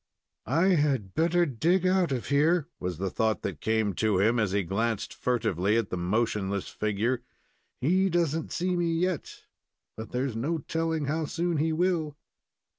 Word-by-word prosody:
"I 165 - +3
had 140 - +1
better 170 +2 +3
dig 170 +7 +1
out 185 -4 +2
of 125 -3 -3
here," 155 +3 +3
was 90 -2 -3
the 95 +1 -2
thought 110 -1 0
that 90 -8 -4
came 110 -2 +1
to 105 +1 +1
him, 115 +4 +3
as 105 -4 +1
he 100 0 +1
glanced 110 +4 -1
furtively 105 -4 0
at 115 -4 -1
the - - -1
motionless 100 +1 -1
figure. 110 +4 -1 0.6
"He 185 +8 +3
doesn't 165 -2 0
see 180 +1 0
me 170 -1 +1
yet, 175 -1 -2 0.5
but 110 -1 -8
there 125 +2 0
is 130 -5 -4
no 145 +9 -1
telling 160 0 -2
how 155 +3 -1
soon 170 +2 -1
he 160 +2 +1
will." 160 -3 0
135 Hz, 170 wpm, -28 LUFS, 110-165 Hz, 0.6 s, I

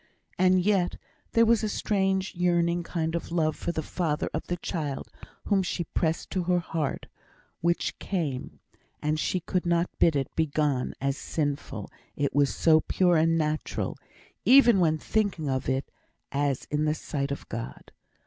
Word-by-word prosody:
And 185 0 +5
yet, 195 -4 +2 0.4
there 230 0 +5
was 230 0 +3
a 215 - 0
strange 190 -2 0
yearning 175 -1 +2
kind 165 -1 -2
of 170 0 -3
love 155 -3 +1
for - - -3
the 160 -2 -3
father 160 0 -2
of - - -3
the 175 - -2
child 155 -5 -4 0.4
whom 200 -2 +3
she 180 -1 -2
pressed 160 0 -1
to 185 -3 -1
her 180 0 +3
heart, 165 -4 -2 0.5
which 170 +1 0
came, 150 -10 -3 0.4
and 155 +1 0
she 180 +3 0
could 180 +2 -1
not 170 0 +1
bid 165 - +4
it 135 -2 -2
begone 150 -4 0
as 140 0 -1
sinful, 140 -8 -3 0.2
it 140 -1 -1
was 145 -1 +3
so 160 -1 +4
pure 180 +1 +2
and 165 +1 +3
natural, 155 -1 -1 0.5
even 245 -6 +7
when 160 -3 +3
thinking 195 -4 -1
of 130 -1 -1
it, 130 +1 -1 0.4
as 140 -2 0
in 150 +1 +1
the 155 0 +1
sight 140 -3 -3
of 140 - -5
God. 115 0 -7
165 Hz, 165 wpm, -27 LUFS, 150-180 Hz, 0.5 s, even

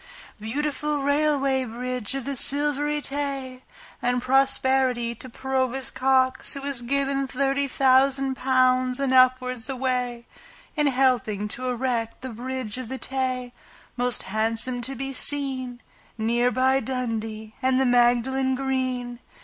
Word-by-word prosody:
Beautiful 290 +5 -2
Railway 285 -2 +1
Bridge 250 0 -3
of 270 - -4
the 280 0 -3
Silvery 295 +2 +3
Tay! 275 -2 -4 0.4
And 245 0 +1
prosperity 260 -2 +2
to 255 +3 -6
Provost 265 +1 -1
Cox, 260 0 +2
who 275 - -6
has 275 -3 0
given 275 +2 0
Thirty 275 +1 0
thousand 270 0 +3
pounds 255 -1 +2
and 275 -2 0
upwards 255 -2 +3
away 250 -2 -2 0.5
In 300 -2 +2
helping 250 -6 +1
to 255 +4 -4
erect 240 -2 -2
the 260 - -6
Bridge 250 0 -5
of 250 -3 -7
the 265 - -4
Tay, 255 -2 -3 0.4
Most 245 -1 0
handsome 225 +4 -1
to 265 +3 -3
be 270 +2 -5
seen, 260 -3 +1 0.3
Near 235 +2 +1
by 260 +2 +2
Dundee 225 -4 -4
and 260 0 +2
the 265 - +2
Magdalen 245 +2 +2
Green. 255 -2 -2
255 Hz, 130 wpm, -24 LUFS, 245-270 Hz, 0.5 s, Silvery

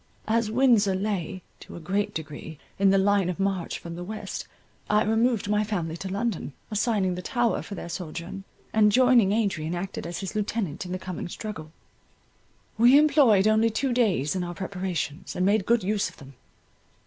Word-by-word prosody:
As 225 0 +1
Windsor 225 -5 +3
lay, 190 -3 -3 0.2
to - - -11
a - - -7
great 200 +5 -1
degree, 155 0 -7 0.2
in 195 0 +5
the 195 - +4
line 195 -1 +3
of 180 - -4
march 195 -3 -1
from 170 0 -8
the 175 - -6
west, 215 +4 -6 0.4
I 210 +1 +4
removed 225 0 +1
my 210 +1 +2
family 175 -7 -3
to 190 +2 -6
London, 200 -7 -2 0.2
assigning 210 -3 +1
the 180 - -5
Tower 240 +3 0
for 205 - -8
their - - -7
sojourn, 170 +2 -6 0.3
and 210 -1 +5
joining 250 -4 +5
Adrian, 190 -7 0
acted 180 -1 -5
as 170 +2 -5
his 195 +2 -5
Lieutenant 200 -5 -2
in - - -7
the 185 - -1
coming 185 -2 -6
struggle. 170 -7 -7 1.1
We 245 +4 +7
employed 280 -10 +5
only 220 +1 +4
two 245 +4 -1
days 195 - +1
in 185 - -1
our 175 0 -5
preparations, 185 -3 -4
and 180 - +1
made 205 0 +2
good 235 -2 +3
use 205 +1 0
of - - -19
them. 135 0 -13
195 Hz, 185 wpm, -26 LUFS, 180-220 Hz, 1.1 s, We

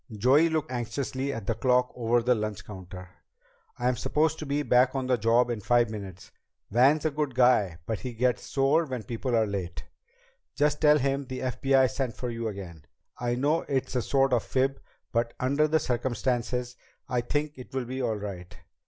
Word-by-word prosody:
Joey 130 +10 +4
looked 155 -3 -2
anxiously 130 +2 -3
at 115 -6 -6
the 115 - 0
clock 125 +2 +2
over 120 0 +1
the 125 +1 +4
lunch 110 -3 -4
counter. 90 -2 -9 0.7
"I'm 125 0 0
supposed 160 +1 +1
to 155 - -6
be 145 +1 0
back 125 0 +3
on 135 -1 -1
the 130 0 +2
job 120 +2 +2
in 115 -3 -3
five 120 +1 +2
minutes. 100 -4 -8 0.4
Van's 135 +7 +4
a 155 - +2
good 145 -3 -2
guy, 120 -9 +3
but 110 -2 -3
he 125 -2 -6
gets 125 +1 +1
sore 140 +4 +2
when 130 -4 -4
people 120 +1 -2
are 110 -1 +3
late." 95 -4 -4 0.7
"Just 150 0 +1
tell 150 -1 +6
him 140 0 -1
the 130 0 -5
FBI 130 +1 +2
sent 125 -2 -3
for 125 -1 -3
you 115 0 -3
again. 90 -7 -8 0.3
I 120 0 0
know 145 +6 +1
it's 130 -2 -1
a 125 - +2
sort 135 +1 +2
of 120 - +3
fib, 135 +3 -1 0.3
but 115 -1 -1
under 140 +4 +2
the 160 +1 +2
circumstances 125 -1 -1 0.3
I 125 -1 0
think 145 +4 -2
it 125 - -10
will 130 -2 -2
be 130 +2 -4
all 115 -3 0
right. 95 -4 -7
125 Hz, 190 wpm, -27 LUFS, 115-135 Hz, 0.7 s, tell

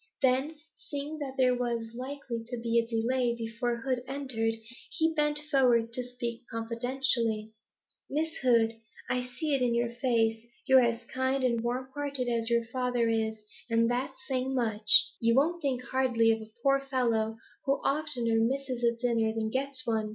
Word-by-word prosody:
Then, 265 +4 +2 0.2
seeing 290 +2 -6
that 270 -2 -5
there 255 -1 +4
was 235 -2 -2
likely 255 -2 -5
to 245 0 -5
be 230 0 +2
a 230 - -1
delay 235 +1 0
before 235 +1 -3
Hood 255 0 -1
entered, 255 -5 -1 0.3
he 320 0 +1
bent 295 -1 +1
forward 240 -4 +3
to 250 - -2
speak 245 -1 -5
confidentially. 230 -1 -1 0.6
'Miss 320 +3 -1
Hood, 230 -3 +2 0.3
I 250 - +1 0.2
see 305 +1 0
it 270 - +2
in 240 -2 +2
your 235 0 0
face, 230 -2 +1 0.2
you're 265 -1 +7
as 235 -1 0
kind 260 +2 -1
and 235 -2 +1
warm 250 +2 -2
hearted 280 -3 -2
as 230 -1 0
your 235 -1 +2
father 245 -1 0
is, 220 -1 -1 0.3
and 230 +1 +3
that's 260 +2 -3
saying 265 0 -1
much. 220 -4 -1 0.3
You 230 0 +3
won't 335 +6 +2
think 260 -4 -1
hardly 245 -3 +2
of 225 0 -1
a 220 0 -11
poor 275 0 +4
fellow 235 -5 0 0.3
who 275 - +3
oftener 275 -6 +1
misses 255 +1 -1
a 235 0 +3
dinner 230 -2 +1
than 220 -1 -2
gets 265 0 -1
one? 220 -2 0
245 Hz, 170 wpm, -29 LUFS, 230-265 Hz, 0.6 s, you're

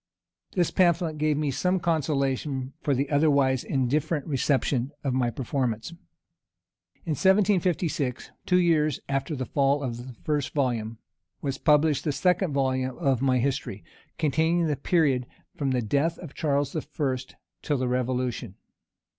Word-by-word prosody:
This 175 -3 +1
pamphlet 170 -3 +2
gave 155 -1 +2
me 150 -2 0
some 180 +7 +1
consolation 140 -4 -1
for 145 -3 +1
the 140 +3 0
otherwise 140 -3 +3
indifferent 145 +3 0
reception 135 -2 0
of 135 -3 0
my 125 -2 +1
performance. 120 0 -2 1.1
In 165 - -2
1756, 180 - +1 0.2
two 180 - +4
years 155 -5 +2
after 135 +2 -1
the 130 -1 -3
fall 140 +2 +1
of 120 -3 -3
the 120 0 -9
first 150 -2 -1
volume, 115 -5 -1 0.5
was 135 -2 -2
published 150 -1 +3
the 150 - 0
second 180 +3 +1
volume 130 -2 0
of 135 -3 +1
my 130 -2 +3
history, 130 -5 -2 0.3
containing 160 +3 +2
the 150 -2 0
period 140 -5 +1 0.3
from 140 -2 -1
the 125 -2 0
death 145 +9 0
of 165 -5 -10
Charles 140 -1 0
I. 155 - 0 0.8
till 145 - 0
the 130 0 -1
revolution. 125 -4 -2
140 Hz, 140 wpm, -26 LUFS, 130-155 Hz, 1.1 s, two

